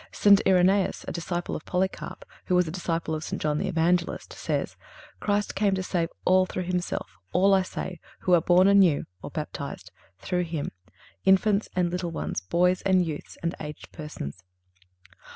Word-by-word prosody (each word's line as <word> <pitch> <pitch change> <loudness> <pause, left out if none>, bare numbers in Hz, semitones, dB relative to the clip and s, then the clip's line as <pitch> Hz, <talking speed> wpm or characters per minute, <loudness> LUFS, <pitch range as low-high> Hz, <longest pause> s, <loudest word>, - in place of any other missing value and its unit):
St. 200 -1 +6
Irenæus, 190 +1 +3
a - - -2
disciple 175 +1 -3
of - - -6
Polycarp, 190 - -3 0.2
who 180 - +1
was 180 -1 +3
a - - -4
disciple 165 -2 -2
of 155 0 -3
St. - - -4
John 150 -1 0
the - - -1
Evangelist, 170 +1 0
says: - - -2 0.4
"Christ 205 0 0
came 200 -1 +2
to 190 - -2
save 170 -3 -1 0.2
all 185 0 +4
through 185 - -3
Himself; 175 - -3
all, 195 +3 +5
I 190 - +5
say, 185 -1 -5 0.2
who 180 - +2
are 170 - +6
born 180 +3 +5
anew 195 -7 +5 0.2
(or - - -6
baptized) - - -6 0.3
through 180 - -1
Him—infants 185 - 0
and 180 -1 +1
little 180 -1 -2
ones, 165 - -3
boys 180 - +2
and 185 -2 +3
youths, 155 -3 -6
and 170 +1 0
aged 150 0 -8
persons." 95 - -7
180 Hz, 170 wpm, -26 LUFS, 165-190 Hz, 0.4 s, St